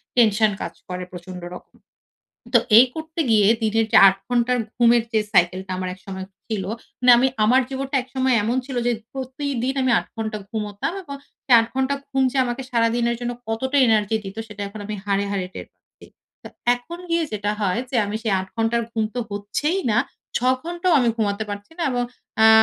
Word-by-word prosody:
Tension 215 -2 +4
কাজ - - -4
করে 180 0 -4
প্রচন্ড 180 0 -9
রকম। - - -14 0.8
তো - - +9 0.2
এই 255 - +8
করতে 320 +1 -5
গিয়ে 210 -3 +5 0.2
দিনের 220 +1 +2
যে - - +6
৮ 195 - +1
ঘন্টার 245 0 +2 0.2
ঘুমের 235 -1 +5
যে 220 - +3
cycle 185 -1 +3
টা 185 - -5
আমার 185 - -3
একসময় 190 0 -8 0.2
ছিল, 210 -4 -3 0.4
মানে 250 0 +5
আমি 265 +2 +4 0.2
আমার 250 +5 +5
জীবনটা 270 +1 -2
একসময় 260 0 0
এমন 235 +4 0
ছিল 265 -2 -6
যে 245 - +3 0.2
প্রতিদিন 265 -1 -3
আমি 255 - +2
৮ - - -5
ঘন্টা 220 -1 -3
ঘুমোতাম 210 +4 -3
এবং 280 -5 -8 0.3
এ 255 - +3
৮ 225 - -1
ঘন্টা 265 +1 +1 0.2
ঘুম 270 -1 +1
যে 275 - -4
আমাকে 245 +2 -3
সারাদিনের 235 0 +1
জন্য 245 0 -2 0.2
কতটা 260 +5 -1
এনার্জি 220 0 +2
দিত? 195 +2 -8
সেটা 210 -1 -7
এখন 210 +1 -9
আমি 215 - -4
হাড়ে, 200 0 +1
হাড়ে 190 -2 -2
টের - - -7
পাচ্ছি। - - -22 0.4
তো - - -9 0.3
এখন 315 +8 -9
গিয়ে 335 -1 +2
যেটা 205 0 -1
হয় 200 +2 +1
যে 255 - -1
আমি 210 - -3
সেই 220 -3 0
৮ 190 - -6
ঘন্টা 225 +1 +1 0.2
ঘুম 220 -1 0
তো 245 - -1
হচ্ছেই 210 - -1
না, 210 - +3 0.4
৬ - - +3 0.2
ঘন্টাও 345 +2 -1
আমি 240 - +2
ঘুমাতে 210 -1 -1
পারছি 205 +6 -7
না। - - -2
এবং 245 0 0 0.4
অ্যা 220 0 +7
230 Hz, 195 wpm, -22 LUFS, 205-260 Hz, 0.8 s, তো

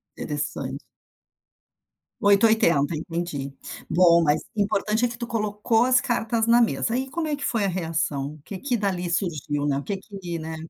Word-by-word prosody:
Interresante. - - -4 1.4
8 200 +2 +5
ou - - +6
80, 170 - +3
entendi, 155 -4 -4 0.4
bom, 170 -1 +5
mas 150 0 +2
importante, 215 +2 +1
é - - +2
que 235 - -8
tu 235 -1 -5
colocou 220 0 +1
as 255 -1 +4
cartas 230 -1 0
na 240 +1 +6
mesa, 230 0 +1
aí 265 +1 -2
como 325 -1 -2
é 300 - 0
que 285 - -5
foi 225 -4 0
a - - +2
reação? 160 -5 -2
O 155 - -17
que 195 - -7
que 260 0 -1
dali 185 -4 -1
surgiu, 150 -5 -1
né, 140 -1 +1
o 140 - -4
que 200 +4 -3
que, 190 -4 -7
né? 160 0 -5
195 Hz, 185 wpm, -24 LUFS, 160-230 Hz, 1.4 s, ou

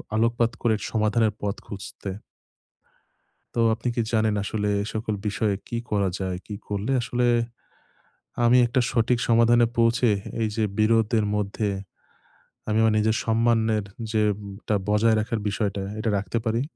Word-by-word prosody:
আলোকপাত 115 +1 +2
করে 115 -2 +2 0.2
সমাধানের 110 0 +2
পথ 100 0 -1
খুঁজতে। 100 0 -7 1.5
তো - - -4 0.2
আপনি 120 - -4
কি - - +2
জানেন 110 -1 +2
আসলে 105 0 -2
এই - - -5
সকল 110 -1 -2
বিষয়ে 105 0 0
কী 120 - -3
করা 100 -2 +1
যায়? 95 -2 -2
কী 105 - -6
করলে 105 +6 -2
আসলে, 120 +1 -1 1.2
আমি 125 +2 +6
একটা 125 +2 +1
সঠিক 120 0 +2
সমাধানে 115 0 +5
পৌঁছে 115 +1 +3 0.4
এইযে 110 +1 -1 0.2
বিরোধের 110 0 +3
মধ্যে, 105 +1 -2 1.0
আমি 110 0 +1
আমার 110 -1 +4
নিজের 110 +1 +2
সম্মানের 110 -2 +2 0.3
যেম 105 -2 +2 0.3
টা 105 - +2
বজায় 110 +1 +4
রাখার 110 +1 -2
বিষয়টা, 100 -1 -1 0.2
এটা 110 - -1
রাখতে 100 +4 -2
পারি? 115 +2 +1
110 Hz, 140 wpm, -25 LUFS, 105-115 Hz, 1.5 s, আমি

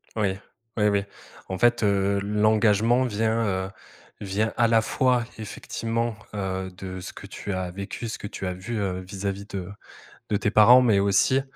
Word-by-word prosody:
Oui, 100 -3 0 0.4
oui 105 -1 +3
oui. 100 -1 +2 0.5
En 95 - -3
fait, 120 +3 +3
heu, 100 -1 +2
l'engagement 110 +3 +3
vient, 115 -1 0
heu, 95 -1 -1 0.5
vient 105 +2 -1
à 120 -1 +4
la 115 -1 +4
fois 120 +2 +2
effectivement, 115 +2 -3 0.2
heu, 95 -2 -3
de 95 0 -7
ce - - -8
que - - -10
tu 100 - -5
as 95 -1 -2
vécu, 100 +5 -6
ce 115 - -4
que - - -6
tu 95 - -5
as 90 - -2
vu, 95 +6 -5
heu, 95 -2 -2
vis-à-vis 100 +1 -5
de 95 -3 -5 0.6
de 105 - +2
tes 105 - 0
parents, 120 +4 +8
mais 110 -5 +4
aussi, 100 +7 +3
105 Hz, 175 wpm, -25 LUFS, 95-115 Hz, 0.6 s, parents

